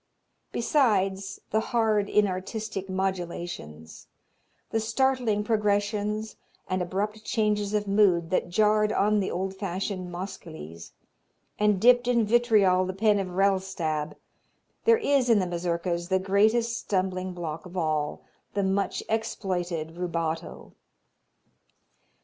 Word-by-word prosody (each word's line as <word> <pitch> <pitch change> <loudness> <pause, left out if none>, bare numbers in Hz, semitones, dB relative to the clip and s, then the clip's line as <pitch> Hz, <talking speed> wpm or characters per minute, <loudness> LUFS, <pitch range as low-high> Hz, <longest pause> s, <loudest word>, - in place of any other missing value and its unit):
Besides 200 -8 +1
the 220 - +3
"hard, 220 -3 +1
inartistic 200 0 -1
modulations, 175 - -4 0.6
the 225 - +1
startling 225 -1 +1
progressions 210 0 0 0.3
and 185 0 -1
abrupt 205 +4 -3
changes 210 -2 0
of 205 -1 0
mood" 190 -5 +3
that 185 - 0
jarred 210 +3 +3
on 210 0 +2
the 195 - -1
old 190 +2 -3
fashioned 190 -1 -4
Moscheles, 160 - -8 0.7
and 210 -2 +3
dipped 245 +3 +5
in 235 -2 +3
vitriol 210 -5 +4
the 185 0 -3
pen 210 +1 +3
of 195 - -2
Rellstab, 185 -6 0 0.7
there 460 0 +6
is 280 - +2
in 230 - +6
the 190 - +1
Mazurkas 175 0 -2
the 190 0 +2
greatest 215 +5 +2
stumbling 185 -1 -2
block 165 -1 -5
of 180 +1 -9
all, 155 -3 -1 0.3
the 200 - +1
much 195 +1 0
exploited 175 -7 -2
rubato. 165 -1 -4
195 Hz, 115 wpm, -27 LUFS, 180-215 Hz, 0.7 s, there